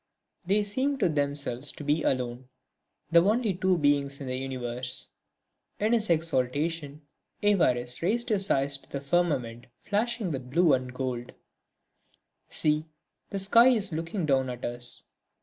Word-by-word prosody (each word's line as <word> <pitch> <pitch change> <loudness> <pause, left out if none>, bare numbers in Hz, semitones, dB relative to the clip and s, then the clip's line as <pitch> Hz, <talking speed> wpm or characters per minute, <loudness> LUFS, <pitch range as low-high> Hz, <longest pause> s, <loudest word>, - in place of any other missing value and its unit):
They 205 +2 +3
seemed 265 +7 -1
to 185 - +3
themselves 140 -3 -1
to - - -9
be 150 +2 +1
alone, 125 -2 -2 0.6
the 170 0 +7
only 215 +1 +2
two 185 0 +1
beings 145 -2 +1
in 140 - -6
the 130 0 -3
universe. 125 -1 -2 0.7
In 215 +3 +2
his 220 -4 +1
exaltation, 150 -1 0 0.4
Évariste 125 -12 +2
raised 235 +8 +1
his 200 -3 +1
eyes 140 0 +1
to - - -22
the 140 - -4
firmament 140 -6 -1 0.2
flashing 220 -2 -1
with 130 -3 -5
blue 170 +2 +4
and 130 -1 -1
gold: 125 -2 -4 1.1
"See, 155 +1 0 0.4
the 200 - -3
sky 220 +5 +6
is 215 -8 +2
looking 165 +3 -3
down 135 -3 +2
at 125 0 -5
us! 120 0 -3
150 Hz, 145 wpm, -28 LUFS, 130-195 Hz, 1.1 s, the